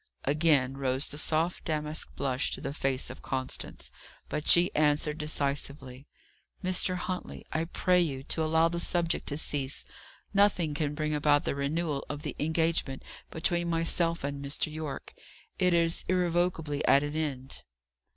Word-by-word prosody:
Again 140 -3 +3
rose 130 0 0
the 145 - -5
soft 160 +3 0
damask 155 -1 -2
blush 135 -1 0
to - - -3
the 135 - -4
face 135 -3 -1
of - - -11
Constance. 130 -1 -4 0.4
But 150 - -3
she 175 +1 +7
answered 150 +1 +2
decisively. 140 -3 -3 0.6
"Mr. 185 0 +2
Huntley, 180 0 -5
I 160 +1 0
pray 180 +1 +2
you 135 -6 -2
to 160 +3 -1
allow 160 +1 +3
the 170 +1 -3
subject 170 -1 0
to 145 - 0
cease. 140 -3 -1 0.5
Nothing 195 -6 +3
can 150 -1 -2
bring 155 0 -1
about 150 0 +3
the - - -1
renewal 145 +1 -1
of 145 0 -5
the 150 - -4
engagement 160 -3 0 0.3
between 170 +1 0
myself 165 0 +1
and 140 0 -3
Mr. 145 +2 0
Yorke. 155 -3 -6 0.5
It 180 -1 +4
is 170 -1 +2
irrevocably 175 -4 0
at 140 - +5
an 145 +1 -4
end." 135 -4 -2
155 Hz, 150 wpm, -29 LUFS, 140-170 Hz, 0.6 s, she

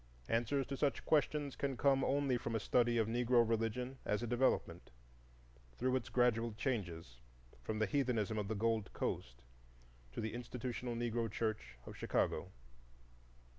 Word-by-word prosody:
Answers 120 +4 +1
to 140 - -4
such 140 0 0
questions 150 -2 +2
can 135 -2 -2
come 135 +1 +4
only 140 -2 +2
from 115 -1 -3
a - - +2
study 120 +2 +2
of 110 -2 +2
Negro 120 0 +3
religion 115 +3 -1
as 105 +3 0
a - - 0
development, 120 +3 +1 0.9
through 130 +1 +1
its 130 - -2
gradual 120 -2 +2
changes 85 - -3 0.4
from 105 - -3
the 110 - +2
heathenism 110 -2 0
of 105 - -2
the 110 - -2
Gold 110 -1 0
Coast - - -3 0.7
to - - -5
the 110 0 -2
institutional 125 0 -4
Negro 115 -1 -1
church 110 - -2
of - - -8
Chicago. - - 0
115 Hz, 150 wpm, -37 LUFS, 110-130 Hz, 0.9 s, come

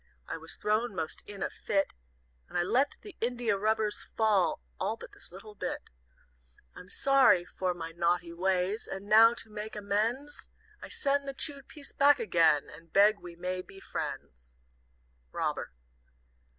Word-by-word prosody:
I - - -3
was - - -5
thrown 215 +1 0
most 160 -3 -3
in 200 -2 -5
a - - -2
fit, 195 -1 0 0.6
And - - -3
I 175 - +3
let 265 +10 +2
the 415 -2 -10
india 240 -2 +1
rubbers 215 +1 0 0.2
fall 215 -5 +3 0.2
All - - -1
but - - -11
this - - -12
little 200 +4 -11
bit. - - -5 0.8
"I'm 180 - -11
sorry 270 -10 +5
for 180 0 -2
my 165 -1 -6
naughty 170 0 0
ways, 185 +4 0
And 195 +1 -5
now, 225 +3 +7
to 220 - -8
make 210 +1 -6
amends, 220 +8 -1 0.3
I - - -8
send 280 0 +1
the 275 - -4
chewed 280 -1 -3
piece 295 -3 -7
back 285 +1 +5
again, 165 -7 +3
And 165 +1 -14
beg 205 +1 +5
we 175 -1 -10
may 185 +1 -3
be 195 +1 -14
friends. - - -6 0.8
"ROBBER." - - -2
205 Hz, 160 wpm, -30 LUFS, 180-235 Hz, 0.8 s, now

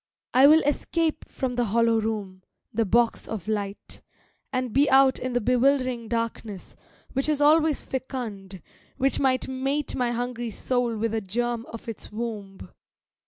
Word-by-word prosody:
I 260 +2 +7
will 315 +2 +6
escape 315 +2 0
from 260 -2 -3
the 245 -1 0
hollow 230 +1 +2
room, 205 -4 -4 0.3
the 225 +1 +1
box 235 +3 +2
of 210 -5 -5
light, 205 -2 -4 0.5
And 255 -3 -2
be 280 +2 +4
out 265 0 +5
in 255 0 -3
the 245 - +2
bewildering 255 0 +2
darkness, 230 -3 -4 0.4
which 270 +3 0
is 300 -2 +1
always 310 0 +4
fecund, 210 - -6 0.3
which 270 +1 +2
might 260 -2 +1
Mate 270 +3 -2
my 250 -2 0
hungry 240 0 -3
soul 240 +1 -1
with 225 +1 -1
a 225 - 0
germ 235 +4 -2
of 230 - -10
its 230 - -7
womb. 210 -4 -6
240 Hz, 155 wpm, -26 LUFS, 220-265 Hz, 0.5 s, I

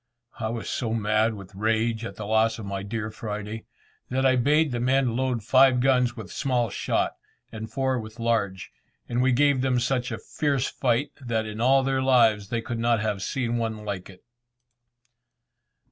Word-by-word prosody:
I 110 -1 -2
was 115 -1 -4
so 115 -3 -2
mad 110 +1 +1
with 100 -1 -11
rage 110 +2 0
at - - -7
the 105 - -6
loss 110 +1 +2
of 110 - -7
my 100 -1 -4
dear 110 +2 -4
Friday, 105 0 -6 0.4
that 130 +1 0
I 130 -1 +5
bade 145 +4 +3
the 120 - -2
men 130 -1 +2
load 125 -3 -1
five 130 +2 +5
guns 125 -2 +2
with 105 -5 -8
small 125 -6 0
shot, - - 0 0.4
and 110 0 -7
four 130 -1 0
with 110 +1 -9
large, 110 -5 -1 0.4
and 120 +1 0
we 130 +1 +3
gave 140 +1 +3
them 130 -1 +2
such 125 0 -1
a - - -3
fierce 140 -4 -1
fire 125 +1 +1 0.2
that 115 -3 -1
in 110 +1 -6
all 135 +2 +4
their 135 0 0
lives 115 -6 +3
they 115 -1 -2
could 115 0 -4
not 115 -1 +2
have 105 -2 -2
seen 120 +2 -1
one 110 -2 -3
like 100 -3 -5
it. 95 - -15
115 Hz, 185 wpm, -25 LUFS, 110-130 Hz, 0.4 s, I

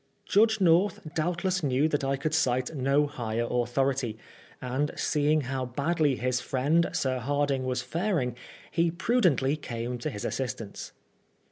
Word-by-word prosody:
Judge 220 +1 +3
North 180 +1 +3
doubtless 175 +3 0
knew 140 0 +2
that 145 -2 -1
I 135 0 0
could 155 +3 -2
cite 130 -2 +1
no 140 +2 +2
higher 120 -5 -3
authority, 125 -1 0 0.4
and 130 +3 -1
seeing 150 +1 +2
how 130 0 -3
badly 145 +3 +1
his 125 +1 -1
friend 145 +7 +1
Sir 130 -1 0
Hardinge 140 0 0
was 125 -1 -1
faring, 165 - -1 0.4
he 170 0 +2
prudently 170 - +2
came 120 -4 -5
to 140 - -2
his 105 -7 -6
assistance. 120 -5 -4
140 Hz, 140 wpm, -28 LUFS, 125-160 Hz, 0.4 s, Judge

